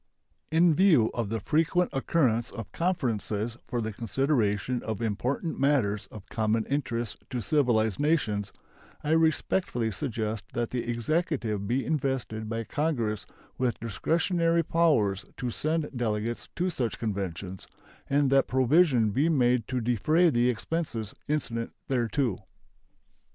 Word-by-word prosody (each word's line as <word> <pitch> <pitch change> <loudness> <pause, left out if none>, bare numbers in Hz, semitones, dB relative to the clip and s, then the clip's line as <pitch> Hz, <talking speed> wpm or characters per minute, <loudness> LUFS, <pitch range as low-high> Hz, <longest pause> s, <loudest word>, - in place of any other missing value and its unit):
In 165 +1 +4
view 155 - +4
of 115 -4 -2
the 115 +1 -1
frequent 165 - +1
occurrence 130 -5 +1
of 115 -4 -8
conferences 115 - -1
for 120 - -2
the 110 -1 -3
consideration 120 -1 0
of 110 -3 -4
important 125 - -2
matters 110 -8 +1
of 105 -1 -11
common 110 0 0
interest 120 -5 -2
to 125 - -2
civilized 115 -4 +2
nations, 110 -10 +1 0.5
I 150 - -1
respectfully 160 -6 +1
suggest 110 -4 -3
that 120 -1 -2
the 120 -1 -2
Executive 120 - -1
be 130 +4 0
invested 130 -7 -2
by 115 0 -2
Congress 120 -7 -1 0.3
with 125 -2 0
discretionary 165 - +1
powers 130 - +2
to 125 -1 -2
send 155 +4 -1
delegates 115 -1 -2
to 180 +1 0
such 120 -8 -2
conventions, 95 -4 -4 0.4
and 140 -1 +3
that 135 0 +4
provision 130 -3 +4
be 145 +10 +2
made 125 -6 +2
to 125 -1 -1
defray 155 - +3
the 120 -1 +3
expenses 120 -3 -3
incident 120 -6 -2 0.2
thereto. 125 -3 0
120 Hz, 130 wpm, -28 LUFS, 110-150 Hz, 0.5 s, In